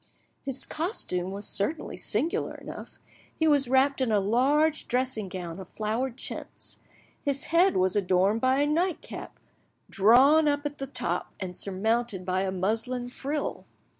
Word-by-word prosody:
His 270 -1 0
costume 245 - -2
was 200 +1 -5
certainly 295 +11 0
singular 275 +11 -1
enough: - - -10 0.4
he 320 - +1
was 285 -4 +3
wrapped 265 +2 +3
in 250 -4 +1
a 210 - +3
large 280 +10 +2
dressing 250 -5 -1
gown 175 -1 -6
of 185 - -10
flowered 230 +4 -2
chintz; - - -6 0.4
his 280 -1 -1
head 350 +4 +3
was 185 +1 +2
adorned 195 +2 +2
by 260 +2 +3
a - - +2
nightcap 335 +4 -2 0.5
drawn 265 +10 +5
up 290 0 0
at 290 0 -4
the 270 - -4
top 275 - -3
and 185 -2 -5
surmounted 205 +1 0
by 185 0 0
a 190 -1 -1
muslin 225 +6 -1
frill. 285 +4 -4
245 Hz, 150 wpm, -27 LUFS, 195-285 Hz, 0.5 s, drawn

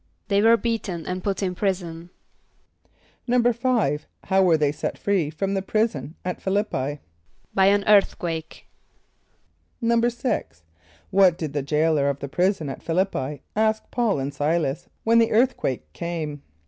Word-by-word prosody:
=They 200 0 +3
were 230 +2 +6
beaten 215 -8 -3
and 185 0 -4
put 200 0 -1
in 185 -1 0
prison.= 175 -3 -3 1.2
=5.= 240 - +2 0.2
How 190 0 +2
were 175 -4 +4
they 150 -2 +2
set - - -4
free 190 -7 0
from 195 +6 -2
the 195 - 0
prison 185 - -1
at 180 - -3
Ph[)i] - - -15
l[)i]p´p[=i]? 145 -9 -1 0.5
=By 190 0 +4
an 200 0 +4
earthquake.= 175 -6 +1 1.2
=6.= 235 - 0 0.5
What 190 -3 +5
did 155 -5 -4
the 145 - 0
jailor 150 0 +2
of 140 - -2
the 140 - -6
prison 180 +1 0
at 135 - -6
Ph[)i] 165 - -2
l[)i]p´p[=i] 150 -7 -1
ask 220 0 +2
P[a:]ul 235 -7 +1
and 135 +1 -2
S[=i]´las 150 -1 -1 0.2
when 230 +1 +4
the 230 - +4
earthquake 175 - 0
came? 160 -4 -4
180 Hz, 150 wpm, -24 LUFS, 150-215 Hz, 1.2 s, were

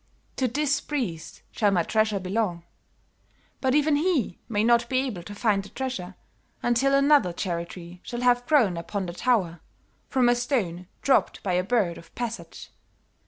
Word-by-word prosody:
To 260 - +2
this 290 +4 0
priest 225 - -4
shall 210 - +2
my 180 -4 +2
treasure 215 +1 +1
belong. 185 -2 -2 1.0
But 260 0 +1
even 300 0 +3
he 300 - 0
may 210 -2 +1
not 235 0 +3
be 255 - +1
able 240 -10 -4
to 205 +4 -9
find 205 -2 +1
the 195 - -12
treasure 200 -9 -5 0.5
until 260 +3 +3
another 275 -8 +4
cherry 170 -1 -3
tree 175 0 -10
shall 240 -1 -5
have 245 0 +3
grown 245 - +3
upon 190 +3 -3
the 175 - -5
tower, 180 -6 +1 0.5
from 255 -2 +3
a 240 - +5
stone 210 - -1 0.2
dropped 275 - +2
by 185 - 0
a 180 +1 +2
bird 195 -5 0
of 165 - -18
passage. 235 -1 -6
225 Hz, 165 wpm, -26 LUFS, 180-260 Hz, 1.0 s, a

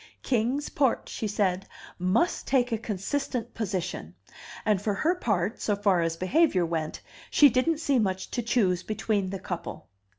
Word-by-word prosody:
Kings 255 +4 0
Port, 270 -5 +1
she 220 - -3
said, 195 -2 0 0.3
must 185 - +1
take 250 -2 +2
a 225 - +1
consistent 230 +3 -3
position; 185 - -4 0.5
and 210 -3 +2
for 205 -1 0
her 320 - +2
part, 205 - -1
so 205 - +1
far 200 -3 +2
as 165 0 -1
behavior 185 - +3
went, 160 -2 -3 0.3
she 290 - +7
didn't 260 +6 +2
see 285 -5 +1
much 190 -3 -1
to 245 - -1
choose 205 -7 +1
between 210 -1 -1
the 195 - -4
couple. 175 -4 -6
210 Hz, 160 wpm, -27 LUFS, 185-250 Hz, 0.5 s, she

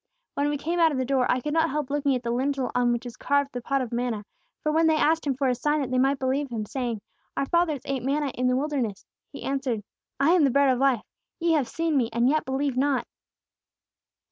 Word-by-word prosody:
"When 285 +1 0
we 295 - -1
came 335 +5 -2
out 325 -1 +5
of 285 - -2
the 260 - 0
door, 260 -1 +1
I 250 - +1
could 295 +4 -3
not 325 0 +3
help 295 -2 -3
looking 285 -1 +1
up - - +2
at 250 - -3
the 235 - -1
lintel 265 +1 -1
on 245 -1 +2
which 240 +1 -2
is 240 - -7
carved 285 0 +1
the 245 - -4
pot 275 +2 0
of 245 - -7
manna; 235 -3 -2 0.4
for 305 - +1
when 320 +1 +3
they 315 - +4
asked 315 0 +2
Him 270 - +1
for 270 +1 0
a 255 - +3
sign 295 +5 0
that 265 -3 -3
they 255 - +2
might 270 +2 +3
believe 270 +2 -1
Him, 225 -3 -3
saying, 240 -2 -3 0.4
'Our 275 - +1
fathers 320 -3 +1
ate 270 -2 -2
manna 280 +2 0
in 250 0 0
the 250 - +2
wilderness!' 260 -8 -2 0.3
He - - -9
answered: 265 -6 -2 0.4
'I 280 - +4
am 355 -3 +5
the 275 - +5
bread 280 +2 +4
of 255 -1 +2
life! 265 -5 +2 0.4
Ye 340 0 +2
have 295 -6 +2
seen 325 +2 0
me, 235 -4 +1
and 235 +2 +2
yet 305 +3 +2
believe 265 0 -1
not!' 270 0 +1
275 Hz, 255 wpm, -26 LUFS, 250-295 Hz, 0.4 s, out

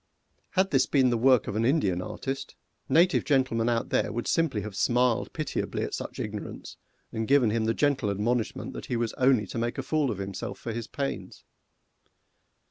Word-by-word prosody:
Had 190 +1 +3
this 135 -2 +3
been 130 -3 +3
the - - +2
work 130 -1 +4
of - - -3
an 110 - +1
Indian 115 - +2
artist, 135 +8 -5 0.3
native 175 +3 +4
gentlemen 130 -5 +1
out 115 -1 0
there - - +1
would 120 +2 -3
simply 160 -11 +1
have 105 -1 -7
smiled 125 +1 +2
pitiably 155 -2 -3
at - - -4
such - - -5
ignorance, - - -6 0.4
and 110 0 -3
given 135 -5 +4
him 110 0 0
the 115 0 +1
gentle 140 -7 +1
admonishment 110 +4 -1
that - - -7
he 125 - -1
was 115 -1 -1
only 130 -4 +3
to 105 - -5
make 120 +1 -2
a 135 - -2
fool 150 -1 +1
of 110 - -3
himself 95 -1 -5
for 115 - -5
his 115 0 -5
pains. 140 -1 -5
120 Hz, 190 wpm, -27 LUFS, 110-135 Hz, 0.4 s, work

